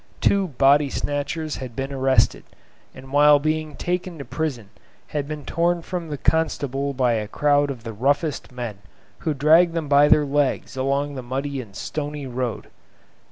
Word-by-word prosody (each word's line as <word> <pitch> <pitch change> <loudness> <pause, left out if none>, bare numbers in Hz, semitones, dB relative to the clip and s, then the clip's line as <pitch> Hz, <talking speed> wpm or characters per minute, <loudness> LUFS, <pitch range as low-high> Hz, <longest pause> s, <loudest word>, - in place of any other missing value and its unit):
Two 195 -1 +2
body 140 0 +4
snatchers 145 +3 -3
had 125 -3 -7
been 135 +2 -4
arrested, 135 -1 +2 0.5
and 130 0 -12
whilst 145 0 +5
being 155 0 -1
taken 180 -1 -3
to 140 - -7
prison 125 -5 -4 0.4
had 145 -2 -3
been 150 -1 -6
torn 170 +1 0
from 175 -2 -5
the 145 - -4
constable 140 -3 0
by 125 -2 +1
a 110 -2 -2
crowd 145 +4 +2
of 125 -4 -6
the 115 -1 -6
roughest 140 +7 0
men, 120 -5 -6 0.4
who 155 - -2
dragged 165 +5 +5
them 160 -3 -2
by 145 +1 +5
their 150 0 +5
legs 140 -1 0
along 140 +2 -1
the 130 - -5
muddy 135 +2 -3
and 105 -5 -14
stony 150 +2 -4
road. 125 -2 -4
145 Hz, 165 wpm, -23 LUFS, 130-155 Hz, 0.5 s, whilst